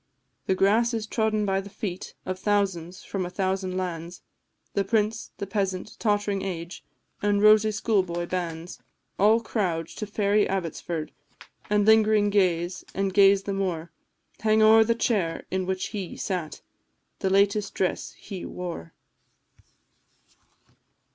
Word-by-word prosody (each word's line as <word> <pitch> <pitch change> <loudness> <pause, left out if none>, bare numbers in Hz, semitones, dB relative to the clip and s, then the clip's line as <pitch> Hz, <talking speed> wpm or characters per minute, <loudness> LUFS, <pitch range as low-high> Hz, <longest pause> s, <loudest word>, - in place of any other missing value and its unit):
"The 190 - +2
grass 225 +5 +3
is 220 -1 -2
trodden 215 -1 0
by 195 -1 +1
the 200 - -10
feet 195 -3 -6
Of 185 0 -4
thousands, 190 -3 -1
from 195 -2 -3
a 175 - -4
thousand 185 0 -2
lands 175 -1 -5 0.5
The 200 - +1
prince, 215 +2 0
the - - -4
peasant, 195 0 -2
tottering 205 -2 0
age, 175 -2 -5 0.4
And 205 0 +2
rosy 215 +1 +6
schoolboy 190 -5 0
bands; 175 -1 -4 0.4
All 215 +4 +5
crowd 175 -8 -1
to 215 - -6
fairy 205 0 +2
Abbotsford, 170 -3 -3 0.6
And 205 -1 +3
lingering 215 -1 +5
gaze, 180 -2 +1
and 195 -1 0
gaze 195 0 +6
the 200 - -3
more; 175 -4 -2 0.5
Hang 220 0 +3
o'er 220 +1 +7
the 230 +1 +1
chair 195 -8 0
in 185 -1 -1
which 190 0 -2
he 195 -5 -5
sat, 180 -5 -4 0.6
The 190 - 0
latest 200 +1 +2
dress 185 - -1
he 195 -4 -8
wore." 170 - -6
195 Hz, 135 wpm, -26 LUFS, 180-210 Hz, 0.6 s, o'er